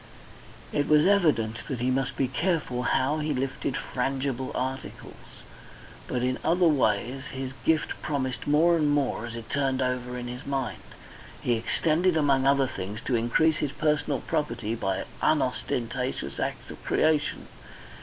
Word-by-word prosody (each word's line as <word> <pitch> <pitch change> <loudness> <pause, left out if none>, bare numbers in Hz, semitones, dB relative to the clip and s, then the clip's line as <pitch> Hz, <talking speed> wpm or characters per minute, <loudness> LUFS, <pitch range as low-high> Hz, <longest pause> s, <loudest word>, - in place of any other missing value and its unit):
It 145 - 0
was 150 +1 +5
evident 150 - +3
he 130 -3 -1
must 135 0 -1
be 135 - +2
careful 150 -3 -1
how 135 +4 +1
he 150 -1 -1
lifted 135 0 -2
frangible 130 0 -2
articles, 130 +1 -6 0.6
but 125 -1 -1
in 130 0 0
other 175 +2 +4
ways 130 -2 +1
his 130 0 -4
gift 160 -1 +1
promised 130 -5 -2
more 160 +4 +5
and 155 -3 +2
more 140 -5 0
as 115 - -7
he 115 - -6
turned 135 +1 0
it - - +2
over 125 -1 -2
in 120 0 -5
his 125 +3 -6
mind. 135 -2 -3 0.6
He 120 - +1
intended 160 +9 +1
among 135 -3 +3
other 140 0 +4
things 105 -3 -5
to 130 - +1
increase 145 +7 +3
his 145 -2 -2
personal 150 -3 0
property 120 -8 -2
by 95 -4 -1 0.2
unostentatious 125 -3 -1
acts - - -3
of - - -11
creation. 155 -1 +1
135 Hz, 150 wpm, -27 LUFS, 125-150 Hz, 0.6 s, was